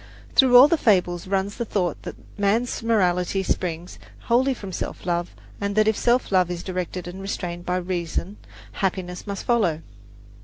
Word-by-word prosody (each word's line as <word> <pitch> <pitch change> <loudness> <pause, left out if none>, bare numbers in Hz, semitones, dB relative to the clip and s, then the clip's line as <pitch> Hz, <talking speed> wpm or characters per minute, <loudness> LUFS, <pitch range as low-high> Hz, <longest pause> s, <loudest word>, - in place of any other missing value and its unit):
Through 255 -2 +6
all 260 +3 +10
the 325 +1 +1
fables 180 -6 +2
runs 195 +1 -1
the 235 - -1
thought 185 -7 -2
that - - -7 0.2
man's 215 +5 0
morality 190 -4 +1
springs 175 -1 -3 0.2
wholly 255 +3 +2
from 200 -5 -8
self 175 - -5
love, 175 0 -2 0.3
and 200 0 -2
that 215 0 +4
if 220 - +3
that - - -5
self 245 -1 +2
love 185 -2 +3
is 175 -1 -4
directed 180 -1 -4
and 180 +2 -7
restrained 175 -3 -5
by 180 0 +1
reason, 180 +2 -3 0.3
happiness 180 - -3
must 200 -1 -5
follow. 180 -10 +1
190 Hz, 175 wpm, -23 LUFS, 175-215 Hz, 0.3 s, all